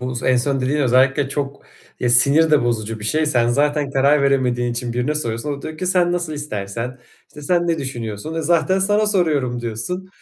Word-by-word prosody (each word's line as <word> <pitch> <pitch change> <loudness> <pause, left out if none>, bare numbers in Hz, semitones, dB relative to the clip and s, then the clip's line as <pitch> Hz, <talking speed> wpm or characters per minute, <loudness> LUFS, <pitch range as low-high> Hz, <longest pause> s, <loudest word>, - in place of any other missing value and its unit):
bu 125 0 -4
s 120 - -4
en 130 - +4
son 135 +2 0
dediğin 135 +4 0
özellikle 135 +1 +2
çok 140 0 -4 0.4
ya, 125 - 0
sinir 140 +7 +5
de 150 -4 +3
bozucu 110 -2 -2
bir - - -7
şey. 155 +7 +1
Sen 120 -5 +2
zaten 145 +2 +1
karar 140 +2 +3
veremediğin 125 -3 +1
için 120 0 -3
birine 125 +5 -1
soruyorsun, 120 -1 -2
o 140 - -4
da - - -14
diyor 155 0 -7
ki: 185 - -3
"Sen 180 -1 +2
nasıl 175 -3 -2
istersen, 120 -3 -5 0.3
işte, 150 - -13
sen 175 +3 +1
ne 165 -2 0
düşünüyorsun?" 120 +1 -5
"E, 165 - -2
zaten 175 +4 +2
sana 205 +2 +2
soruyorum." 150 -11 0
diyorsun. 120 +12 -4
140 Hz, 210 wpm, -20 LUFS, 120-155 Hz, 0.4 s, sinir